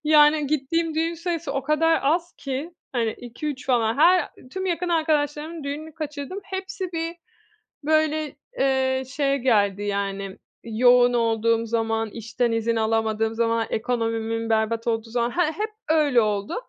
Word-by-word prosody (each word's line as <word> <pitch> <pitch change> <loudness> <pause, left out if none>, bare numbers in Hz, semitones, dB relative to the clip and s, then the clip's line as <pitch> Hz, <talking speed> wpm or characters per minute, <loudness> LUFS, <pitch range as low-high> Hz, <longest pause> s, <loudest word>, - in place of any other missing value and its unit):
Yani 300 0 +5
gittiğim 310 +3 0
düğün 330 +2 0
sayısı 335 -3 -3
o 275 - -1
kadar 320 +3 +3
az 335 +5 +1
ki 280 +4 -4 0.2
hani 235 -3 +1
2-3 260 +3 -6
falan 235 -3 +2
her 350 +3 +5 0.2
tüm 380 +4 -4
yakın 355 0 -1
arkadaşlarımın 310 -1 0
düğününü 300 +2 -5
kaçırdım. 300 +4 -5
Hepsi 380 -1 -5
bir 330 +1 -3 0.7
böyle, 310 0 +1 0.2
eee, 265 -1 +2
şeye 275 +1 0
geldi, 205 -6 +2
yani, 200 -1 -3 0.3
yoğun 245 +2 +4
olduğum 230 -1 +2
zaman, 225 -1 -1
işten 230 +2 -2
izin 225 0 0
alamadığım 220 0 +1
zaman, 230 0 +1
ekonomimin 225 -1 -1
berbat 225 +1 0
olduğu 225 0 -1
zaman, 235 0 0
he 345 -3 +1
hep 425 +7 -3 0.2
öyle 295 -6 +4
oldu. 205 -2 -1
265 Hz, 140 wpm, -24 LUFS, 225-315 Hz, 0.7 s, Yani